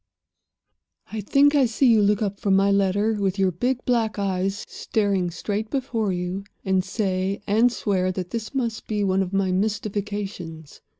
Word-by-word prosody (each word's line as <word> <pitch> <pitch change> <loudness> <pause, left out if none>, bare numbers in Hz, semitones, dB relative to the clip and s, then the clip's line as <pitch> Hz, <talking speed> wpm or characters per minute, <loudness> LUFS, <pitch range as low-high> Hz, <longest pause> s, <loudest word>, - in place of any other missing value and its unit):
"I 220 0 -3
think 280 +8 +4
I 275 -4 +4
see 235 +4 +1
you 230 -4 +6
look 205 +1 +2
up 200 -1 -3
from 195 -2 +2
my 195 +1 +4
letter, 200 +2 +2
with 195 -1 0
your 190 -1 +2
big 250 +9 -1
black 230 -3 +1
eyes 195 0 -1
staring 200 -4 0
straight 210 +5 -3
before 235 -6 -1
you, 180 +2 -3 0.2
and 190 -1 +2
say 190 0 -2
and 225 +5 +3
swear 190 -5 0
that 180 -1 -5
this 230 +3 -5
must 235 -4 -2
be 210 -1 -1
one 190 0 +2
of 185 -1 -2
my 195 -1 +1
mystifications. 195 -5 -3
200 Hz, 170 wpm, -24 LUFS, 190-220 Hz, 0.2 s, you